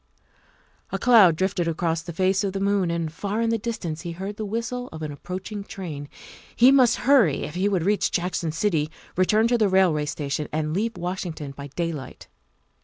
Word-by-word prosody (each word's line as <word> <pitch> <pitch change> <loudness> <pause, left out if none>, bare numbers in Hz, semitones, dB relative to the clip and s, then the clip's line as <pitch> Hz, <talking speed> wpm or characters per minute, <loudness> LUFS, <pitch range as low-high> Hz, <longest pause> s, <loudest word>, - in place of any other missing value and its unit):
A - - -1
cloud 215 -9 +6
drifted 185 0 0
across 165 0 -1
the 170 +1 -7
face 190 +4 +1
of 195 -2 -1
the 195 - -2
moon, 200 -2 +1
and 165 -2 -2
far 205 +5 -3
in 230 0 +1
the 230 - 0
distance 175 -8 -4
he 170 0 -5
heard 195 +4 -5
the 215 - -4
whistle 235 +3 -3
of 160 0 -7
an 150 - -4
approaching 185 +7 -6
train. 155 -8 -7 0.5
He 250 +3 +7
must 255 -4 +5
hurry 245 - +4
if - - -5
he 190 +3 +1
would 185 -5 0
reach 205 +1 +2
Jackson 175 -2 -1
City, 165 -3 0 0.3
return 215 +5 +3
to 240 -1 +2
the 210 -2 +3
railway 180 -6 +3
station, 145 -1 -3
and 155 0 -1
leave 220 +5 -1
Washington 175 -5 -4
by 140 +1 -8
daylight. 150 -2 -5
185 Hz, 190 wpm, -24 LUFS, 160-210 Hz, 0.5 s, He